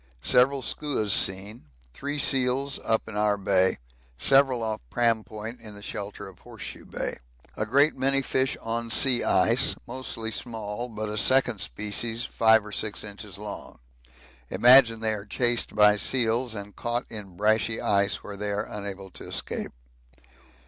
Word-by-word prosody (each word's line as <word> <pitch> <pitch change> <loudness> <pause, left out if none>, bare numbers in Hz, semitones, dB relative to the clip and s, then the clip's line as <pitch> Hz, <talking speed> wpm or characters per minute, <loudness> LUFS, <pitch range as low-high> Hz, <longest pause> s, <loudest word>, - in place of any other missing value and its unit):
Several 130 - +3
skuas 135 -9 -2
seen 95 +2 +1 0.3
three 145 - -5
seals 135 0 0
up 110 0 0
in 110 - -8
our 105 0 +1
Bay 95 -1 +2 0.4
several 135 - +3
off 110 -1 -3
Pram 115 -2 +1
Point 110 +3 -9
in 105 -2 -9
the 100 - -12
shelter 100 -1 -6
of 95 - -15
Horse - - -12
Shoe - - -9
Bay. - - -4 0.4
A 110 - -3
great 140 +6 +3
many 135 +1 +1
fish 130 0 -1
on 115 +1 -3
sea 125 +1 +4
ice - - +3
mostly 120 -3 -5
small, 110 0 -5
but 110 -1 -5
a 105 0 -3
second 130 -5 +3
species 110 +4 -2
5 110 -1 +3
or 105 - -9
6 105 +1 -3
inches 100 -2 -8
long: 105 0 -8 0.7
imagine 115 +2 +6
they 110 -1 +1
are 105 -2 -5
chased 120 +3 0
by 105 0 +5
seals 120 +1 +1
and 100 0 -8
caught 120 +1 -3
in 100 -5 -8
brashy 110 +2 +1
ice 100 0 +1
where 100 - -8
they 105 +1 -4
are 100 0 -2
unable 100 -2 -7
to - - -9
escape. - - -4
110 Hz, 160 wpm, -26 LUFS, 105-125 Hz, 0.7 s, imagine